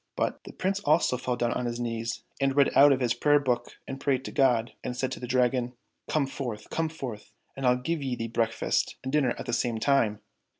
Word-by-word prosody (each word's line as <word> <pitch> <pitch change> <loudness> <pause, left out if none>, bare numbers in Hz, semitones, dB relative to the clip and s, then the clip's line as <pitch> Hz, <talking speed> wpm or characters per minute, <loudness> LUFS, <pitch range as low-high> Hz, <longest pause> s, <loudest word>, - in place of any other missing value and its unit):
" - - -56
But - - -2
the - - -9
Prince 190 +1 -1
also 155 -7 +3
fell 125 0 -2
down 120 -1 0
on 125 - -2
his 120 0 -3
knees 115 -1 -3 0.2
and 135 -1 +1
read 140 -1 +4
out 145 +1 +8
of 135 -1 +2
his 120 -2 +2
prayer 145 +4 +4
book 125 -3 -2
and 135 - -5
prayed 135 -2 0
to - - -5
God, 125 -5 +2
and 125 - -4
said 130 - -1
to - - -5
the 125 - -6
Dragon, 125 0 +1 0.2
" - - -26
Come 155 -3 +2
forth! 125 -5 -6
come 165 -1 0
forth! 130 -9 -7 0.2
and 135 -1 -1
I'll 125 0 +4
give 160 +6 -2
thee 125 -4 -3
breakfast 115 0 0
and 130 +1 -4
dinner 140 -5 +2
at - - -6
the 120 - -3
same 120 -1 0
time 110 -5 +2
125 Hz, 240 wpm, -28 LUFS, 120-140 Hz, 0.2 s, out